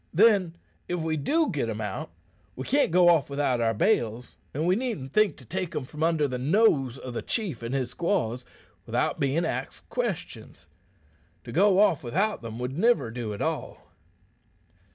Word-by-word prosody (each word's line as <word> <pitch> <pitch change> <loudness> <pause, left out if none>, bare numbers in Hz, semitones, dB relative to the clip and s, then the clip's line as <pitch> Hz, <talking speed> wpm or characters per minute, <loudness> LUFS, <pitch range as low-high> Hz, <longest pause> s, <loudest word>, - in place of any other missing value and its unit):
Then, 195 -4 +4 0.3
if 175 0 -2
we 160 -1 -1
do 305 - +1
git 135 -6 -1
'em 110 -1 -4
out, 105 -3 -4 0.5
we 130 - -5
can't 285 +2 +2
go 175 +1 +5
off 160 -5 +3
without 140 -4 0
our 115 -1 +1
bales, 120 - 0 0.2
an' 155 +4 -2
we 180 +1 +3
needn't 210 - -3
think 215 -1 +3
to 130 - -14
take 185 +3 -4
'em 150 - -1
from 150 +4 -9
under 160 -2 +2
the 125 -2 -4
nose 135 - +3
o' 125 - -5
the 120 - -4
chief 195 - -2
and 115 +3 -3
his 130 -2 -1
squaws 130 - -1 0.4
without - - 0
bein' 140 +5 +1
axed - - -4
questions. - - -4 0.8
To 120 - -8
go 190 - +4
off 180 -9 +3
without 195 - 0
them 115 -1 -7
would 125 +2 -4
niver 230 - +3
do 115 -2 -4
at 100 - -4
all." - - -4
150 Hz, 180 wpm, -27 LUFS, 125-185 Hz, 0.8 s, go